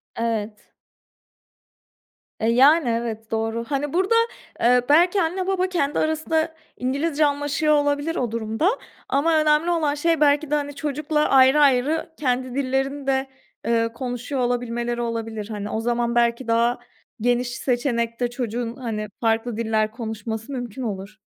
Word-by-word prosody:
Evet. 220 -2 -3 1.7
Eee, 220 - 0
yani, 275 +3 +5
evet, 230 -1 -3
doğru. 225 +1 -1
Hani 285 +1 -2
burada, 380 +6 +2 0.5
eee, 245 +1 +5
belki 350 +6 +5
anne, 365 +3 -1
baba 375 -1 +1
kendi 295 -5 0
arasında 315 +1 0 0.2
İngilizce 285 +4 0
anlaşıyor 290 +1 +1
olabilir 290 +2 0
o 240 -3 -1
durumda 225 - 0 0.4
ama 315 +4 +2
önemli 305 +3 +3
olan 305 -4 +1
şey 325 +1 +1
belki 290 0 +3
de, 300 - +3
hani, 285 -1 -3
çocukla 300 +1 -1
ayrı 265 +2 +6
ayrı 285 +4 +3
kendi 255 -2 -1
dillerini 270 +1 -1
de, 265 0 +1 0.4
eee, 230 0 +2
konuşuyor 245 +2 -4
olabilmeleri 240 -1 -1
olabilir, 225 -2 -4
hani. 205 -1 -5
O 220 - -2
zaman 235 0 0
belki 235 +1 +1
daha 235 +1 +2 0.4
geniş 245 +1 +1
seçenekte 240 -2 -1
çocuğun, 240 -1 -4
hani, 220 -5 -4
farklı 225 0 0
diller 220 -1 0
konuşması 220 0 -5
mümkün 245 -2 -5
olur. 200 -1 -5
250 Hz, 140 wpm, -23 LUFS, 230-295 Hz, 1.7 s, ayrı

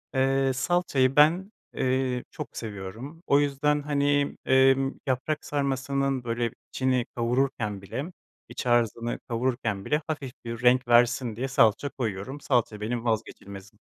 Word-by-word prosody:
ııı, 135 0 +2
salçayı 135 -3 +1
ben, 170 +7 +4 0.2
eee, 130 -1 0
çok - - -8
seviyorum. 110 - -7
O 140 - +5
yüzden, 145 +1 +1
hani, 145 0 +1
ımm, 135 +1 +4
yaprak 135 +4 -1
sarmasının 135 -1 -1
böyle 115 0 -1 0.2
içini 130 -2 +1
kavururken 120 -4 -1
bile, 130 +8 -5 0.4
iç - - -6
harcını 120 -1 +1
kavururken 115 -4 -1
bile 150 +1 +1
hafif 145 -5 -4
bir 115 0 -5
renk 125 0 +4
versin 120 -1 +3
diye 130 +3 -2
salça 135 0 +3
koyuyorum. 120 +3 -4
Salça 115 -6 0
benim 115 +2 -3
vazgeçilmezim. 105 -2 -4
130 Hz, 130 wpm, -26 LUFS, 115-140 Hz, 0.4 s, O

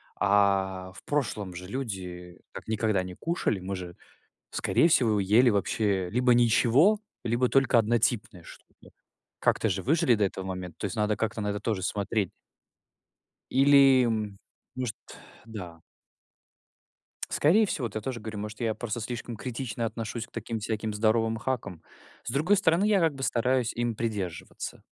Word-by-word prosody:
а, 95 -2 +1
в 85 - -14
прошлом 110 -10 -2
же 90 +1 -8
люди 90 -7 -6
так - - -9
никогда 110 -3 +1
не 90 0 -8
кушали. 165 - -1
Мы 95 +1 -4
же, 90 -2 -8 0.5
скорее 165 - +2
всего, 115 -10 +3
ели 105 +6 +4
вообще 100 -2 0
либо 125 +2 +3
ничего, 120 - +4 0.3
либо 120 +2 +1
только 135 -2 +4
однотипное 115 -3 0
что-то. - - -16 0.5
Как-то - - +2
же 95 0 -2
выжили 135 -3 +3
до 105 - 0
этого 95 -1 -2
момента. 90 -2 -6
То - - -3
есть 105 - -3
надо 105 -1 +1
как-то 110 0 -2
на 105 - -1
это 105 0 -2
тоже 105 -2 -2
смотреть. 100 0 -1 1.2
Или, 135 -1 +6
м, 110 -3 -2 0.4
может 125 -3 -3 0.5
Да. 90 -7 -8 1.5
Скорее 195 +9 +4
всего, 145 -10 -2
вот 110 - -6
я 110 - -2
тоже 125 +2 -4
говорю, 110 -1 -6
может, 105 +1 -6
я 115 -2 0
просто 120 -1 -4
слишком 120 +1 -5
критично 120 0 -4
отношусь 115 0 -4
к - - -32
таким 115 -2 -4
всяким 110 0 -3
здоровым 110 +1 +1
хакам. 110 -8 -4 0.4
С - - -4
другой 160 +10 +3
стороны, 185 0 +3
я 210 -2 +4
как 165 -4 +2
бы 135 - -6
стараюсь 125 0 +1
им 120 -1 -1
придерживаться. 100 -7 -5
110 Hz, 155 wpm, -28 LUFS, 100-125 Hz, 1.5 s, Или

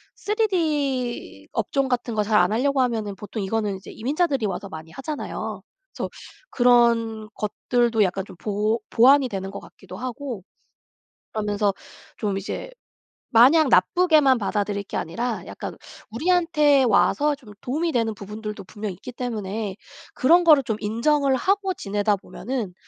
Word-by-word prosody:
3D 305 - -1
업종 275 -1 0
같은 245 -2 -2
거 210 - +2
잘 210 0 +2
안 180 +2 +3
하려고 265 +4 +2
하면은 220 -5 -1
보통 210 +2 -6
이거는 205 0 -1
이제 190 - -12
이민자들이 275 -1 0
와서 195 +1 -5
많이 160 -1 -9
하잖아요. 290 - -5 0.4
그래서 - - -2 0.4
그런 235 -3 +3
것들도 230 +1 +1
약간 195 0 -1
좀 - - -13
보 215 +3 0
보완이 265 +3 +6
되는 195 -3 -4
것 - - -6
같기도 185 -1 -12
하고 250 -2 -5 0.9
그러면서 210 -1 0 0.4
좀 205 -3 -2
이제 200 - -5 0.6
마냥 270 +6 +6
나쁘게만 300 - +4
받아들일 205 -1 -1
게 - - -5
아니라 230 +8 -3
약간 - - -7 0.3
우리한테 300 +1 +3
와서 290 +5 +3
좀 240 -7 -15
도움이 315 +7 -1
되는 230 -5 0
부분들도 210 +1 -7
분명히 205 +1 -6
있기 220 +7 -9
때문에 215 -4 -4 0.4
그런 340 +7 +4
거를 305 -5 +6
좀 220 -3 -2
인정을 270 +6 +1
하고 390 +7 +1
지내다 205 - 0
보면은 225 0 -5
235 Hz, 315 characters per minute, -23 LUFS, 210-275 Hz, 0.9 s, 보완이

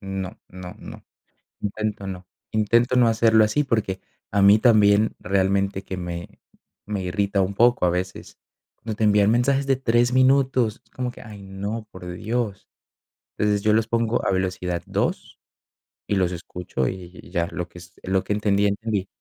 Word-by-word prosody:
no, 95 -1 -5
no, 90 -1 -9
no. - - -11 0.6
Intento 105 0 -3
no, 95 -1 -7 0.3
intento 115 +4 +2
no 125 - +5
hacerlo 110 -1 +4
así, 110 +8 +1
porque, 110 -7 -1 0.3
a 100 - +1
mí 100 +2 +7
también, 105 -2 +4
realmente, 95 0 0
que 95 - -5
me, 85 -1 -7 0.5
me 100 -2 -3
irrita 100 +2 0
un 95 +1 -2
poco 120 0 +4
a - - +3
veces. 90 +1 -5 0.4
Cuando 110 -2 -6
te 110 - 0
envían 105 0 +4
mensajes 135 +4 +2
de 135 - +3
3 120 -1 +2
minutos, 130 -3 +3
es - - -33
como 125 -1 -3
que: - - -14
"Ay, 105 -3 -11
no, 100 +3 -5
por 90 -2 -9
Dios". 110 +2 -3 0.7
Entonces 105 -1 +1
yo 105 - +3
los 110 +1 +2
pongo 115 0 0
a - - +2
velocidad 90 -2 -1
2 - - -2 0.7
y 100 - 0
los 90 -2 +2
escucho, 85 -6 -4
y 90 +3 -6
y - - -15
ya, 85 -2 0
lo 90 -1 -4
que 90 - -13
es 85 +1 -14
lo 95 0 +1
que 105 - -1
entendí, 105 -1 +2
entendí. 100 -1 -1
100 Hz, 175 wpm, -23 LUFS, 95-115 Hz, 0.7 s, mí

